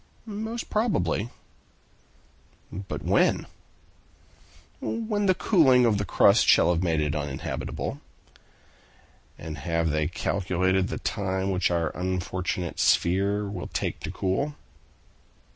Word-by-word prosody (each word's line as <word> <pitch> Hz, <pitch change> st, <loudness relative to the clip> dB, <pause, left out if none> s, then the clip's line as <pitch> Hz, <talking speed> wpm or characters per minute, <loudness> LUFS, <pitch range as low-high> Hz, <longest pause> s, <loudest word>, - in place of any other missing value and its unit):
"Most 220 Hz, +2 st, -5 dB
probably." 120 Hz, -, 0 dB, 1.4 s
"But 95 Hz, +2 st, -6 dB
when?" -, -, +2 dB, 1.3 s
"When 215 Hz, -3 st, -1 dB
the 185 Hz, -, +4 dB
cooling 135 Hz, -, +4 dB
of 105 Hz, -3 st, +2 dB
its 100 Hz, -, -5 dB
crust -, -, +5 dB
shall 90 Hz, -, +5 dB
have 85 Hz, -, -1 dB
made 85 Hz, -3 st, +1 dB
it 75 Hz, 0 st, 0 dB
uninhabitable." 75 Hz, -3 st, -4 dB, 1.4 s
"And 80 Hz, -2 st, -7 dB
have 85 Hz, +1 st, 0 dB
they 75 Hz, 0 st, +1 dB
calculated 95 Hz, 0 st, 0 dB
the -, -, -4 dB
time 95 Hz, -1 st, -2 dB
which 90 Hz, -1 st, +1 dB
our 85 Hz, -2 st, -1 dB
unfortunate 90 Hz, -1 st, -3 dB
sphere 100 Hz, +4 st, +2 dB
will 100 Hz, -, -5 dB
take -, -, -3 dB
to -, -, -6 dB
cool?" 140 Hz, +11 st, -1 dB
95 Hz, 110 wpm, -26 LUFS, 85-125 Hz, 1.4 s, crust